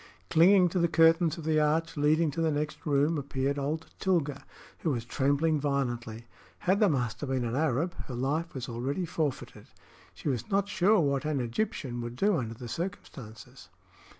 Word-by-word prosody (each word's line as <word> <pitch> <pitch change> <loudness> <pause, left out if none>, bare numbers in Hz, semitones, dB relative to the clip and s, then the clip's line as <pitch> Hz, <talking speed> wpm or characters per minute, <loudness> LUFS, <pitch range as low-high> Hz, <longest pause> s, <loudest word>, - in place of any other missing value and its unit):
Clinging 180 +3 +6
to 180 - -1
the 170 - +3
curtains 165 0 +4
of 165 - -7
the 155 0 +2
arch 155 +2 +1
leading 155 +2 +2
to 165 - -3
the 165 - +2
next 150 +1 -3
room, 145 +2 +2
appeared 140 0 -2
old 150 +3 -2
Tilga, 165 -7 0 0.4
who 165 - -1
was 120 -5 -2
trembling 145 +4 +1
violently. 120 -5 -2 0.3
Had 190 +3 +1
the 210 -3 +5
master 130 -1 -2
been 130 -2 -1
an 115 +1 -2
Arab, 155 +3 0
her 125 - -6
life 145 +7 -2
was 125 -2 -4
already 130 +9 -2
forfeited. 155 -4 -4 0.5
She - - -7
was 120 -5 -2
not 200 0 +1
sure 205 +1 +3
what 140 -3 0
an 155 -2 -1
Egyptian 120 - -3
would 120 0 -6
do 200 +8 +2
under 115 -4 -4
the 120 +1 -8
circumstances. 125 - -7
145 Hz, 180 wpm, -29 LUFS, 130-165 Hz, 0.5 s, Clinging